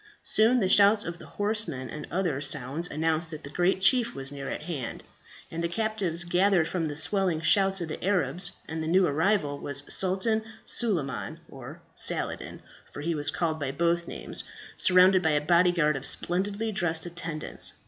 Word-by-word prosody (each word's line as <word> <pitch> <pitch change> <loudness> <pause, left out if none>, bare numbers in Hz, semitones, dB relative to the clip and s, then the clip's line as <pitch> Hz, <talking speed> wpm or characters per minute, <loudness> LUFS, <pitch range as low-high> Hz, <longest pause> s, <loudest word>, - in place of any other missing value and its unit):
Soon 230 +4 +3
the 190 - +2
shouts 205 +2 +5
of 170 0 -6
the - - -12
horsemen 205 -11 -2
and 150 -1 -8
other 170 -5 -1
sounds 145 +3 -1
announced 160 +2 -1
that 155 -1 -8
the 140 - -8
great 180 +4 +1
chief 240 +3 +3
was 135 0 -5
near 140 -1 -6
at - - -5
hand, 150 -8 -5 0.5
and 165 +1 -4
the - - +1
captives 195 -4 0
gathered 180 -1 +2
from 170 -1 -2
the 145 -2 -4
swelling 185 0 +1
shouts 195 +3 +3
of 170 - -3
the 155 - -7
Arabs 180 -2 0 0.2
that 160 0 -4
the 160 - -3
new 185 +3 +4
arrival 150 -1 0
was 140 0 -3
Sultan 195 +4 +1 0.2
Suleiman 170 - -1
or - - -11
Saladin, - - -1 0.3
for - - -8
he 170 +3 -1
was 145 -2 +1
called 160 -2 -1
by 140 -2 -2
both 170 +3 0
names - - -4 0.3
surrounded 185 0 +5
by 160 -3 +1
a - - +3
body 170 +4 +3
guard 150 -4 +1
of 135 - +2
splendidly 200 +5 0
dressed 170 -4 0
attendants. 165 -2 -3
170 Hz, 180 wpm, -27 LUFS, 155-195 Hz, 0.5 s, shouts